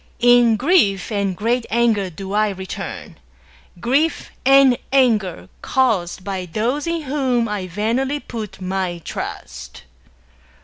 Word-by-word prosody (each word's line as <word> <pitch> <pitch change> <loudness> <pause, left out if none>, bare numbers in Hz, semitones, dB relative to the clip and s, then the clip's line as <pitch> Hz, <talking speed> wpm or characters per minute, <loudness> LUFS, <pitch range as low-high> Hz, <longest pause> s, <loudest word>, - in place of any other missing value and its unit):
In 245 -1 +5
grief 235 - +2
and 200 -3 -1
great 235 +3 0
anger 225 -4 +2
do 190 +3 -7
I 215 0 +2
return 190 - -7 0.3
— 65 - -26
grief 280 - 0
and 270 -2 +5
anger 225 -9 +2
caused 210 -10 0
me - - -19
by 190 -2 -3
those 245 - -1
in 335 -1 -2
whom 260 -4 0
I 205 -3 -3
vainly 235 +10 -1
put 220 -8 -7
my 185 -1 -2
trust! - - -7
225 Hz, 130 wpm, -20 LUFS, 195-260 Hz, 0.3 s, In